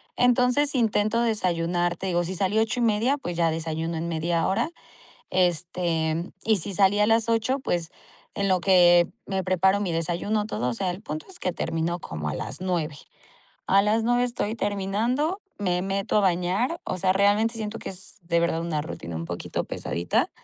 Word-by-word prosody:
Entonces 250 +4 +3
intento 225 -1 +2
desayunar. 175 -5 0
Te 190 - -4
digo 175 -1 +1
si 185 +2 -3
salí 195 +4 +1
8 225 +3 0
y - - +2
media, 230 +6 +2
pues 175 -11 -5
ya 165 -1 +3
desayuno 160 +1 -3
en 165 +1 -3
media 165 0 0
hora. 195 - 0 0.6
Este 170 -2 0
y 220 -2 +3
si 195 +3 -3
salí 200 +2 +4
a 210 - +4
las 225 0 +3
8 230 +4 +1
pues 170 -8 -2 0.5
en 200 0 0
lo 185 -1 +3
que, 175 -2 +6 0.2
me 190 -1 -2
preparo 190 +2 +3
mi 185 -5 -1
desayuno 175 +6 -1
todo, 125 - -2
o - - -2
sea, 180 +9 -1
el 185 +4 -8
punto 155 -6 -6
es 375 - -8
que 180 - -1
termino 165 +2 -2
como 75 - -5
a - - -3
las - - -5
9. 170 -5 -2 0.7
A 195 +1 +5
las 215 +2 +2
9 245 +1 +3
estoy 235 -3 -2
terminando, 225 - -1 0.2
me 180 -3 0
meto 195 +2 0
a - - +4
bañar. 190 - +1
O 185 - -3
sea, 185 +1 +3
realmente 205 +4 +3
siento 220 0 -4
que - - -7
es 190 +3 -10
de 170 0 +1
verdad 165 -1 0
una 160 -3 -2
rutina 85 - -6
un 85 - -4
poquito 85 +1 -4
pesadita. 85 +1 -1
185 Hz, 190 wpm, -25 LUFS, 170-215 Hz, 0.7 s, que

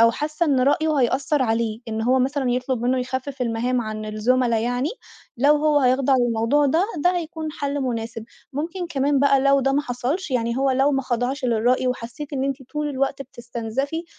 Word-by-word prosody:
أو 230 0 +7
حاسة 305 +7 -2
إن 275 -4 +2
رأيه 300 +4 +2
هيأثّر 265 +3 +1
عليه 225 -2 -1
إن 220 0 -2
هو 255 +3 +3
مثلًا 265 0 0
يطلب 250 -1 -1
منه 255 +1 +1
يخفِّف 260 +1 -3
المهام 245 +2 0
عن 215 -1 -5
الزملا 235 +2 +1
يعني، 245 +4 -1 0.5
لو 285 +5 +4
هو 300 0 +3
هيخضع 260 +1 +3
للموضوع 240 +4 +2
ده، 320 +7 +2 0.2
ده 355 0 +4
هيكون 320 -2 -4
حَلّ 285 -1 -3
مناسب، 230 -3 -3 0.3
ممكن 340 +6 -3
كمان 285 -3 +1
بقى 275 0 +4
لو 275 0 +4
ده 270 +1 +1
ما 285 +2 +1
حصلش 275 +8 -3
يعني 235 -2 0
هو 270 +1 +2
لو 265 +2 +3
ما 270 -1 0
خضعش 255 +2 -2
للرأي 245 +2 +2
وحسيتِ 250 +4 -5
إن 270 -1 -1
أنتِ 275 -1 -1 0.2
طول 300 -1 -2
الوقت 275 0 -1
بتستنزَفي، 245 +5 -4
260 Hz, 185 wpm, -23 LUFS, 240-285 Hz, 0.5 s, أو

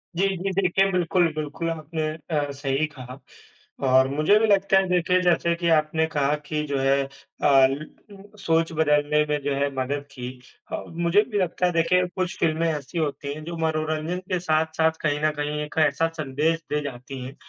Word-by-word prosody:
जी, 190 +3 +2
जी, 195 +2 -2
देखिए 195 +1 +2
बिल्कुल, 180 -1 +2
बिल्कुल 155 +2 -3
आपने 160 -1 -3 0.2
अ, 145 -3 0
सही 140 +1 -1
कहा, 130 -1 -9 0.7
और 130 +1 +5
मुझे 155 +9 +3
भी 225 - +2
लगता 195 -1 +4
है 190 - 0
देखिए 180 0 +2
जैसे 170 -1 +2
कि 170 0 -1
आपने 160 0 +2
कहा 145 -1 +2
कि 150 0 -1
जो 140 -1 -1
है 135 +1 +2
अ, - - -12 0.3
ल 135 +2 +4 0.5
सोच 165 -2 +1
बदलने 150 -1 +2
में 150 0 +1
जो 145 - 0
है 140 +1 +1
मदद 140 +2 -2
की 125 -3 -6 0.4
और - - -5
मुझे 170 +4 +3
भी 205 - 0
लगता 180 -1 0
है 180 - +2
देखिए, 180 +2 +3
कुछ 180 0 -4
फ़िल्में 165 +1 +1
ऐसी 150 +1 -4
होती 145 -2 -2
हैं 155 +1 -8
जो 170 0 -5
मनोरंजन 155 +1 -1
के 180 - +1
साथ-साथ 160 -1 +1
कहीं 150 -2 0
न 155 - +3
कहीं 150 +1 -2
एक 150 - -9
ऐसा 145 +4 0
संदेश 155 +3 0
दे 150 - +1
जाती 130 -1 -7
हैं 135 +2 -9
155 Hz, 190 wpm, -24 LUFS, 145-170 Hz, 0.7 s, और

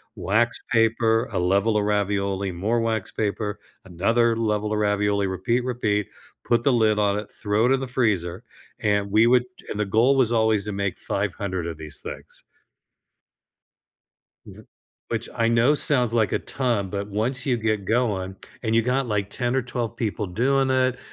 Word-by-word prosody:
wax 115 +4 +1
paper, 115 +1 +2
a - - -1
level 100 +5 +2
of 105 - +1
ravioli, 100 -1 0
more 105 +7 0
wax 110 -3 -1
paper, 105 -1 -2 0.3
another 115 +6 +1
level 105 -1 -1
of - - 0
ravioli, 105 -1 +1
repeat, 115 +7 0
repeat, 110 -5 -1 0.3
put 120 -1 +2
the 140 - +3
lid 110 -3 +3
on 100 -1 +2
it, 105 0 -5
throw 105 +1 0
it - - +2
in 135 - +3
the 135 - -4
freezer, 100 -9 -1 0.4
and 100 -1 +1
we 110 +2 +5
would 125 0 +4 0.2
and 105 - -4
the 105 - +1
goal 115 +7 +3
was 120 -3 +3
always 110 -3 +2
to 105 - -4
make 100 -1 -2
500 100 -3 -3
of 85 -2 -5
these 75 -2 -8
things. - - -9 2.0
Mhm. - - -13 0.4
Which - - -3
I 115 0 +1
know 115 +5 +4
sounds, 125 -6 +1
like, 110 -3 +2
a - - +2
ton, 120 -7 -1
but 100 +1 -4
once 115 +6 -2
you 125 -3 +2
get 110 -3 -1
going 100 -4 -1 0.3
and 110 -2 0
you 115 - +5
got, 130 +3 0
like, 105 -3 -1
10 120 +2 -1
or 130 - +1
12 120 -2 -4
people 105 -2 -2
doing 130 +8 +1
it 130 -1 +1
110 Hz, 175 wpm, -24 LUFS, 100-120 Hz, 2.0 s, we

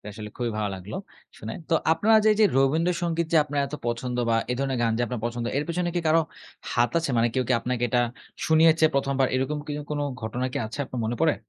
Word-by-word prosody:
এটা - - -10
আসলে 105 0 -7
খুবই 120 -1 -1
ভালো 105 -1 0
লাগলো 95 +2 -7 0.4
শোনে। 110 +1 -6 0.2
তো - - +2 0.2
আপনারা 220 +6 +4
যে - - +5
এই - - -1
যে 215 - +7
রবীন্দ্রসঙ্গীত 165 +4 +1
যে - - +5
আপনার 145 -1 -2
এত 140 - -7
পছন্দ 120 +1 -2
বা 115 - +3 0.2
এ - - 0
ধরনের 135 -2 -1
গান 115 -1 +2
যে - - +1
আপনার 125 -1 -4
পছন্দ 120 0 -2
এর 145 - -1
পেছনে 175 +1 -1
কি 175 - +1
কারো 160 +1 +5 0.5
হাত 120 0 +2
আছে? 165 -3 -2
মানে 115 +1 +3
কেউ 130 -1 +1
কি - - +3
আপনাকে 125 0 -2
এটা 125 0 +2 0.5
শুনিয়েছে 160 0 +5
প্রথমবার 135 -1 +2
এরকম 135 +3 0
কি 150 0 -4
কোন 150 -1 -1 0.2
ঘটনা 120 +4 -2
কি - - -2
আছে 110 - -8
আপনার 125 -2 -5
মনে 115 +2 -2
পড়ে? 160 -2 +4
135 Hz, 235 wpm, -25 LUFS, 120-160 Hz, 0.5 s, যে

